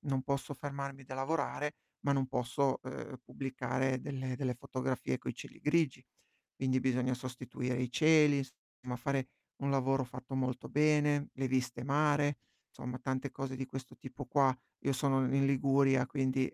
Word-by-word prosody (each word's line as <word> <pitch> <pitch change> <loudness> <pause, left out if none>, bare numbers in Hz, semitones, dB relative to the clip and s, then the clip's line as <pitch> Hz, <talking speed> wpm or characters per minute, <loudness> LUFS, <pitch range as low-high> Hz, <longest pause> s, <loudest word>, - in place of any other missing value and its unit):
non 135 -2 -1
posso 140 +1 -2
fermarmi 140 -1 -5
da 130 - -7
lavorare, 150 +1 -1 0.2
ma 140 - 0
non 135 -1 +2
posso, 130 +2 0
uhm, 130 +1 -6
pubblicare 130 0 -1
delle 130 -2 -3
delle 130 -1 -1
fotografie 130 - -2
coi - - -4
cieli - - -11
grigi. 150 -5 +2 0.5
Quindi 130 -1 +1
bisogna 125 0 +1
sostituire 125 0 -3
i 125 -1 -1
cieli, 155 -1 +6
insomma, 135 -2 -4 0.2
bisogna 125 -1 -4
fare 130 +1 -1 0.3
un 140 - -1
lavoro 135 -1 +2
fatto 130 +2 -8
molto 130 -1 -1
bene, 150 -1 +3
le 135 0 -1
viste 125 -1 0
mare, 145 0 +3 0.3
insomma 125 +1 -5
tante 130 +1 -2
cose 130 -1 -4
di 130 - -3
questo 130 0 -7
tipo 130 +1 -8
qua. 130 0 +3 0.3
Io 135 - +3
sono 135 0 +2
i 135 - +2
in 135 - +4
Liguria, 135 -1 +4
quindi 130 -1 +1
135 Hz, 165 wpm, -34 LUFS, 130-140 Hz, 0.5 s, cieli